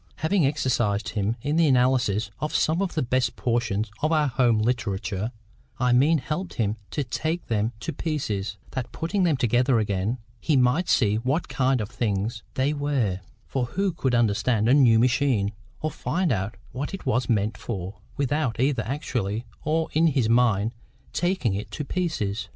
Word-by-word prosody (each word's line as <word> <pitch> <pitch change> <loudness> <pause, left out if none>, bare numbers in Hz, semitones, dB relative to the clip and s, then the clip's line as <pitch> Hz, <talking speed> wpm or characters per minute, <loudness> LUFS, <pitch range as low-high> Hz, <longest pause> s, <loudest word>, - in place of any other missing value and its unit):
Having 160 -1 +2
exercised 120 -7 0
him 105 +1 -1
in 145 +3 0
the 165 -1 +5
analysis 125 -5 +2
of 150 +1 -3
some 160 +4 +2
of 195 -2 -2
the 155 - +1
best 130 0 0
portions 115 -3 -1
of 155 - +1
our 155 -2 +3
home 120 -2 +3
literature,—I 110 +1 -2
mean 145 +6 +5
helped 165 +6 -4
him 110 -1 0
to 145 - -2
take 160 +7 -2
them 110 0 0
to - - -3
pieces, 110 -11 -2
that, 130 -2 -4
putting 180 +3 0
them 160 -5 +2
together 125 0 +3
again, 105 +2 0 0.2
he 155 -4 +2
might 135 +8 +2
see 105 -4 +3
what 130 +9 -1
kind 130 -1 +1
of 105 -1 -3
things 105 +1 -1
they 135 +3 +1
were—for 130 -4 -2
who 190 +10 -1
could 135 -6 0
understand 110 0 +2
a 125 - +5
new 125 -6 +6
machine, 120 -4 +2 0.3
or 155 - -1
find 180 -3 -1
out 100 0 -2
what 145 +8 -4
it 195 - -11
was 130 -1 0
meant 110 -1 +1
for, 95 -3 -5 0.2
without 140 -3 0
either 130 -2 +2
actually 120 -5 -2 0.2
or 160 +1 +1
in 160 +2 +4
his 135 -7 +2
mind 115 -2 +3 0.4
taking 175 - 0
it 100 +2 -4
to 150 - -5
pieces? 110 - -2
125 Hz, 170 wpm, -25 LUFS, 110-145 Hz, 0.4 s, new